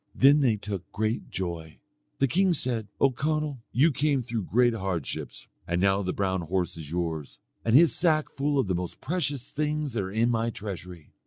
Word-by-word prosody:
Then 140 Hz, +3 st, +6 dB
they 120 Hz, -5 st, +3 dB
took 100 Hz, -3 st, -6 dB
great 110 Hz, +2 st, -2 dB
joy. 85 Hz, -4 st, -5 dB, 0.4 s
The 135 Hz, -, +3 dB
king 185 Hz, +6 st, +3 dB
said, 120 Hz, -6 st, -1 dB
"O 135 Hz, -, +4 dB
Conall, 150 Hz, +1 st, -1 dB
you 150 Hz, +7 st, +4 dB
came 145 Hz, -1 st, +1 dB
through 115 Hz, -4 st, -3 dB
great 120 Hz, +1 st, +4 dB
hardships. 95 Hz, -8 st, -4 dB, 0.2 s
And 85 Hz, +1 st, 0 dB
now 100 Hz, +1 st, +3 dB
the 90 Hz, -2 st, -1 dB
brown 95 Hz, -2 st, -1 dB
horse 90 Hz, +2 st, -1 dB
is 80 Hz, -3 st, -8 dB
yours, 80 Hz, -3 st, -3 dB, 0.3 s
and 115 Hz, +1 st, +2 dB
his 165 Hz, +3 st, +7 dB
sack 155 Hz, -3 st, +2 dB
full 145 Hz, +1 st, 0 dB
of 135 Hz, -, +3 dB
the 95 Hz, -, -1 dB
most 90 Hz, 0 st, -4 dB
precious 145 Hz, -5 st, -2 dB
things 150 Hz, -2 st, -1 dB
that 115 Hz, -, 0 dB
are 95 Hz, 0 st, -4 dB
in 115 Hz, +3 st, +2 dB
my 115 Hz, 0 st, +1 dB
treasury." 90 Hz, -7 st, -7 dB
115 Hz, 190 wpm, -27 LUFS, 95-140 Hz, 0.4 s, his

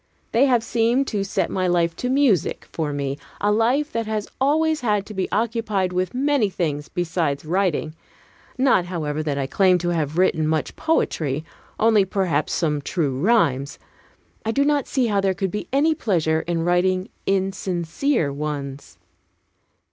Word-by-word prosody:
They 255 Hz, +5 st, +4 dB
have 245 Hz, -3 st, +3 dB
seemed 235 Hz, +4 st, +1 dB
to 205 Hz, -3 st, -1 dB
set 200 Hz, -, -1 dB
my 185 Hz, -1 st, 0 dB
life 170 Hz, -1 st, +1 dB
to 250 Hz, -, -2 dB
music 260 Hz, -, +2 dB
for 155 Hz, -3 st, -2 dB
me, 140 Hz, 0 st, -3 dB, 0.2 s
a 205 Hz, -, +2 dB
life 245 Hz, +8 st, +2 dB
that 230 Hz, -1 st, -2 dB
has 215 Hz, -1 st, -2 dB
always 310 Hz, +3 st, +2 dB
had 210 Hz, -4 st, +1 dB
to 215 Hz, -, -9 dB
be 190 Hz, -2 st, -2 dB
occupied 215 Hz, -4 st, 0 dB
with 185 Hz, +3 st, -1 dB
many 275 Hz, -5 st, +2 dB
things 150 Hz, -5 st, -3 dB
besides 165 Hz, -5 st, -1 dB
writing. 170 Hz, -3 st, 0 dB, 0.6 s
Not, 255 Hz, -9 st, +3 dB
however, 155 Hz, -4 st, -3 dB
that 150 Hz, -2 st, -2 dB
I 140 Hz, -, -1 dB
claim 185 Hz, +6 st, +3 dB
to 175 Hz, 0 st, -2 dB
have 160 Hz, -2 st, -1 dB
written 165 Hz, -4 st, +2 dB
much 155 Hz, -3 st, -1 dB
poetry: 155 Hz, -, 0 dB, 0.3 s
only 220 Hz, -2 st, +5 dB
perhaps 185 Hz, -6 st, 0 dB
some 150 Hz, -4 st, 0 dB
true 140 Hz, -4 st, -1 dB
rhymes: 150 Hz, -, +2 dB, 0.7 s
I 220 Hz, -, -3 dB
do 275 Hz, +5 st, +2 dB
not 290 Hz, -2 st, +1 dB
see 260 Hz, -2 st, +1 dB
how 205 Hz, -3 st, +1 dB
there 190 Hz, -1 st, +1 dB
could 190 Hz, 0 st, -2 dB
be 210 Hz, -, -4 dB
any 295 Hz, +4 st, +3 dB
pleasure 170 Hz, -, +1 dB
in 170 Hz, -1 st, 0 dB
writing 185 Hz, +1 st, +1 dB, 0.2 s
insincere 190 Hz, -, 0 dB
ones. 140 Hz, -, -5 dB
185 Hz, 165 wpm, -22 LUFS, 160-230 Hz, 0.7 s, only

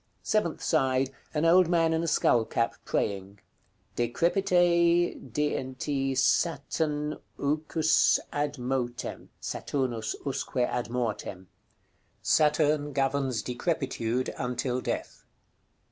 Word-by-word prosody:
Seventh 190 Hz, -7 st, 0 dB
side. 135 Hz, -4 st, +2 dB, 0.2 s
An 155 Hz, +1 st, 0 dB
old 180 Hz, +1 st, +6 dB
man 165 Hz, -2 st, +3 dB
in 160 Hz, -, +1 dB
a 170 Hz, -, -2 dB
skull 120 Hz, -6 st, +3 dB
cap, 115 Hz, +1 st, -1 dB
praying. 100 Hz, 0 st, -2 dB, 0.6 s
"DECREPITE 175 Hz, -, +3 dB, 0.2 s
DNT 135 Hz, 0 st, -1 dB
SATN 150 Hz, +1 st, 0 dB, 0.2 s
UQ^s 155 Hz, +2 st, +2 dB, 0.2 s
ADMOTE." 130 Hz, -4 st, -3 dB
(Saturnus 120 Hz, -5 st, -2 dB
usque 135 Hz, -1 st, -3 dB
ad 120 Hz, -1 st, 0 dB
mortem.) 110 Hz, -6 st, -3 dB, 0.7 s
Saturn 150 Hz, -1 st, +2 dB
governs 135 Hz, -4 st, 0 dB
decrepitude 130 Hz, -3 st, -2 dB
until 125 Hz, +1 st, -1 dB
death. -, -, -4 dB
140 Hz, 90 wpm, -28 LUFS, 125-160 Hz, 0.7 s, old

